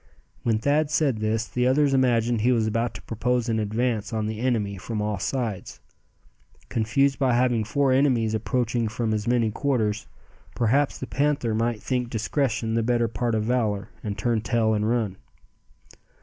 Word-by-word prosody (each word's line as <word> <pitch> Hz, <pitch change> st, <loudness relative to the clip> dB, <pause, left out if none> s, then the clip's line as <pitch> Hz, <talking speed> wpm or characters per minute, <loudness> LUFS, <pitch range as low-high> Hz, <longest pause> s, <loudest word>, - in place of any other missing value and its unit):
When 115 Hz, -2 st, +1 dB
Thad 145 Hz, +6 st, +1 dB
said 145 Hz, -6 st, +1 dB
this, 110 Hz, +1 st, 0 dB
the 125 Hz, 0 st, 0 dB
others 140 Hz, +1 st, +3 dB
imagined 120 Hz, -3 st, +2 dB
he 125 Hz, +3 st, +3 dB
was 115 Hz, -3 st, +2 dB
about 115 Hz, +2 st, -1 dB
to -, -, -9 dB
propose 125 Hz, +2 st, -1 dB
an 110 Hz, -1 st, +1 dB
advance 110 Hz, +1 st, -1 dB
on 110 Hz, -2 st, -1 dB
the 110 Hz, 0 st, -4 dB
enemy 110 Hz, -6 st, -1 dB
from 115 Hz, +1 st, -4 dB
all 105 Hz, -1 st, -1 dB
sides. 115 Hz, -3 st, -3 dB, 0.9 s
Confused 135 Hz, +5 st, +1 dB
by 130 Hz, -3 st, +2 dB
having 120 Hz, -2 st, +2 dB
four 140 Hz, +4 st, +1 dB
enemies 130 Hz, -5 st, +2 dB
approaching 120 Hz, +1 st, 0 dB
from 110 Hz, 0 st, -2 dB
as 105 Hz, 0 st, -2 dB
many 120 Hz, -2 st, +2 dB
quarters, 110 Hz, -5 st, -1 dB, 0.5 s
perhaps 135 Hz, +5 st, +2 dB
the -, -, -5 dB
panther 140 Hz, -4 st, 0 dB
might 115 Hz, 0 st, -1 dB
think 125 Hz, -2 st, -1 dB
discretion 115 Hz, 0 st, -1 dB
the 115 Hz, -, +2 dB
better 120 Hz, 0 st, +1 dB
part 115 Hz, +1 st, -1 dB
of 110 Hz, -, 0 dB
valor, 110 Hz, -4 st, 0 dB
and 105 Hz, -2 st, -4 dB
turn 115 Hz, -3 st, 0 dB
tail 110 Hz, 0 st, +1 dB
and 105 Hz, 0 st, 0 dB
run. 110 Hz, -6 st, 0 dB
115 Hz, 170 wpm, -25 LUFS, 110-125 Hz, 0.9 s, others